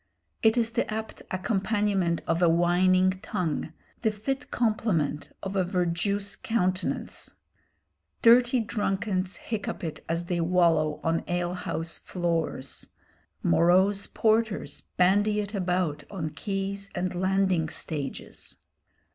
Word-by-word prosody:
It 220 +1 +4
is 230 -1 +2
the 225 - -1
apt 220 0 -5
accompaniment 195 -2 0
of 165 +2 0
a 175 - +6
whining 185 +2 +4
tongue, 160 -3 -2 0.3
the 220 - +3
fit 265 +7 -3
complement 215 -11 0
of 195 +1 -4
a 190 - +3
verjuice 185 +3 0
countenance. 185 -4 -1 0.9
Dirty 240 +1 +6
drunkards 195 -3 -1
hiccup 220 -5 -4
it 160 -2 -5
as 170 +1 -1
they 175 -1 -1
wallow 165 -3 +2
on 165 0 +1
ale 175 0 -1
house 165 -2 -3
floors. 165 -6 -3 0.6
Morose 190 - +4
porters 220 -1 +1 0.2
bandy 205 +3 +4
it 205 0 -4
about 180 -6 0
on 165 -6 -4
quays 195 +1 -3
and 180 +1 -1
landing 185 -3 +1
stages. 155 -3 -4
185 Hz, 115 wpm, -27 LUFS, 170-205 Hz, 0.9 s, a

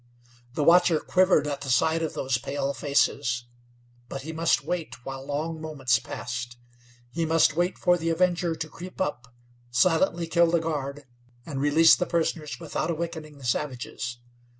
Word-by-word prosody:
The 150 - 0
watcher 170 0 +5
quivered 185 -4 +3
at 145 -1 -3
the 135 - -5
sight 160 +6 +2
of 160 - -3
those 130 -2 0
pale 140 +1 -2
faces; 125 -4 0 0.6
but 135 - -6
he 160 +2 -6
must 155 -4 +2
wait 150 -7 -4
while 135 0 -6
long 155 +3 -3
moments 135 -7 +1
passed. 120 0 -6 0.5
He 165 +4 -2
must 160 -1 +3
wait 175 +2 0
for 175 -1 +3
the 165 0 -1
Avenger 170 0 +1
to 160 - -5
creep 180 +4 -10
up, 125 -8 -3 0.4
silently 170 +5 +2
kill 170 +1 +3
the 170 0 +3
guard, 145 -3 -4 0.4
and 140 -4 -4
release 155 +3 +6
the 180 - -2
prisoners 160 -2 -1
without 165 0 -3
awakening 160 -2 -4
the 135 - -11
savages. 125 -2 -3
155 Hz, 160 wpm, -26 LUFS, 135-165 Hz, 0.6 s, release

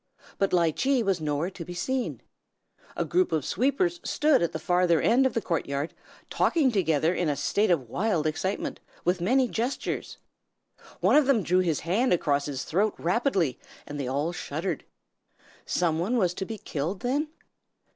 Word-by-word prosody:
But 195 - +2
Ly 170 -3 +3
Chee 265 - +1
was 195 -5 0
nowhere 150 +4 -1
to 175 - -8
be 175 +2 -8
seen. 255 +8 -2 0.7
A - - -1
group 365 0 +1
of 155 -4 0
sweepers 280 +8 +1
stood 295 -2 +3
at 170 - +1
the - - -3
farther 175 0 +2
end 255 - +4
of 255 - -6
the 230 - 0
court 165 -3 -1
yard, 140 +3 -3 0.3
talking 290 -6 +2
together 165 -5 +2
in 175 -3 0
a 145 - 0
state 205 +8 +1
of 150 -9 +1
wild 180 - 0
excitement, 160 +6 -2 0.3
with 180 0 +1
many 255 +7 +3
gestures. 240 +4 -3 0.8
One - - +4
of 300 -3 +5
them 245 -7 +3
drew 180 +2 +2
his 170 -5 0
hand 205 +9 +2
across 145 -4 +1
his 135 -2 -3
throat 205 +6 0
rapidly, 180 - 0 0.3
and 145 0 -6
they 135 - -2
all 145 +6 -1
shuddered. 165 +2 -4 0.8
Some 165 -3 +1
one 215 +9 0
was 180 -6 +2
to 190 - -4
be 220 +1 -6
killed, 170 +1 -4
then? 275 +5 0
180 Hz, 175 wpm, -27 LUFS, 160-235 Hz, 0.8 s, of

